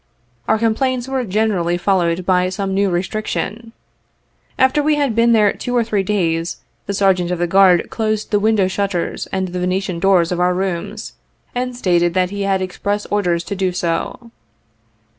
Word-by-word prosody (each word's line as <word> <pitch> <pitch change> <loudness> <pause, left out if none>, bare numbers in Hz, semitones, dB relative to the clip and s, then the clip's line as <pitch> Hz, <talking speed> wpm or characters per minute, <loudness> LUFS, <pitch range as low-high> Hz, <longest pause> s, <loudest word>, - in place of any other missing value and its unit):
Our 220 - +3
complaints 245 +3 0
were 265 -1 -1
generally 190 -4 0
follow 180 -1 +1
ed 170 +2 -2
by 180 -1 +2
some 195 +1 -3
new 200 0 +2
restriction. 215 +4 -3 0.9
After 260 +3 +3
we 300 +1 +2
had 285 -5 0
been 230 +1 +4
there 215 -3 +4
two 245 -1 -4
or 235 - +3
three 215 -3 0
days, 170 -4 -1 0.3
the 200 - -2
Sergeant 190 -3 +2
of 180 - -1
the 175 - 0
Guard 185 0 +4
closed 215 -1 -2
the 205 - +3
window 210 -2 +2
shutters 195 -2 -2
and 190 -1 -2
the 180 +1 -4
Venetian 185 -1 -1
doors 180 -2 +3
of 175 - -1
our 180 0 +2
rooms, 190 +3 -4 0.4
and 250 0 -3
stated 175 -6 +1
that 185 0 +1
he 205 0 -4
had 195 -1 0
express 200 +3 -3
orders 175 -5 +1
to 200 - -5
do 190 -1 0
so. 180 +7 -3
195 Hz, 180 wpm, -18 LUFS, 180-220 Hz, 0.9 s, been